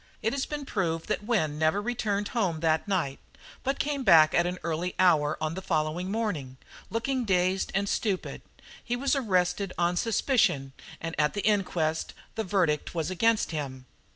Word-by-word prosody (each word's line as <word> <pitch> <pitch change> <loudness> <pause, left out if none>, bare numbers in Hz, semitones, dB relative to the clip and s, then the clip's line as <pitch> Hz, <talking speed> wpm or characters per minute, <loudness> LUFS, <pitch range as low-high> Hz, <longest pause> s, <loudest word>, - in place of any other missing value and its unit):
It 225 +2 +1
has 275 -1 -1
been 295 -1 -5
proved 165 -9 -2
that 210 -1 -1
Wynne 155 -11 0
never 160 +5 +2
returned 205 -2 -1
home 185 -10 -1
that 160 +1 +1
night, 175 -9 -1 0.4
but 270 +1 0
came 285 -2 -1
back 160 -7 +7
at 170 +1 +3
an 180 +1 -3
early 170 +2 -2
hour 155 -5 +3
on 155 0 -2
the 190 - -5
following 165 +1 -1
morning, 185 - -2 0.3
looking 255 +3 -1
dazed 185 -2 +1
and 200 +1 +1
stupid. 200 -2 -2 0.4
He 240 - -1
was 275 +3 +1
arrested 185 -5 0
on 175 0 +1
suspicion, 200 - +1 0.3
and 165 0 -4
at 150 +4 +2
the 205 - -1
inquest 175 -7 0 0.2
the 220 - -2
verdict 175 -6 0
was 165 +1 -1
against 225 +3 +2
him." 135 -5 -5
185 Hz, 170 wpm, -28 LUFS, 160-215 Hz, 0.4 s, back